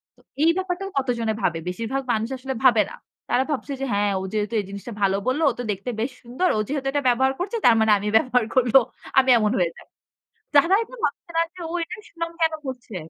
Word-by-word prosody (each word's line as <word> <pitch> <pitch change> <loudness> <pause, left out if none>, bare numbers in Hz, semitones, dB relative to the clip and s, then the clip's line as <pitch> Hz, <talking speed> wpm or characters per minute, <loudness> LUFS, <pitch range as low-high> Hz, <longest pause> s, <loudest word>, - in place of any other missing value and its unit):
তো - - -25 0.2
এই 330 - +6
ব্যাপারটাও 375 +1 -3
কতজনে 235 -4 -1
ভাবে। 165 -1 0
বেশিরভাগ 230 +8 -3
মানুষ 220 +1 -1
আসলে 265 +1 -4
ভাবে 235 -4 +6
না। - - -8 0.3
তারা 255 - +3
ভাবছে 280 0 -3
যে - - 0
হ্যাঁ 205 0 +2
ও - - -5
যেহেতু 210 +1 -1
এই 200 - -3
জিনিসটা 200 +4 -7
ভালো 195 0 +3
বলল 275 +5 +1
ও - - -2
তো - - -2
দেখতে 200 +5 -5
বেশ 240 +4 -1
সুন্দর। 255 +10 -1
ও - - +1
যেহেতু 275 -1 -3
এটা 290 - 0
ব্যবহার 265 +2 +2
করছে 390 +6 -2
তার 235 - +7
মানে 220 -1 +4
আমি 205 +1 -4
ব্যবহার 250 -5 +2
করব। 250 -3 +2 0.5
আমি 265 0 +2
এমন 215 -2 +2
হয়ে 170 -2 +1
যাই। - - -15 0.7
যারা 335 +7 +6
এটা 480 +2 -12
ভাবছে - - -2
না 330 - +5
যে 365 - -14
ও - - -5
এটা 330 - -7
সুনাম 335 0 -5
কেন 320 0 +3
করছে? 245 -6 -7
250 Hz, 225 wpm, -23 LUFS, 220-295 Hz, 0.7 s, তার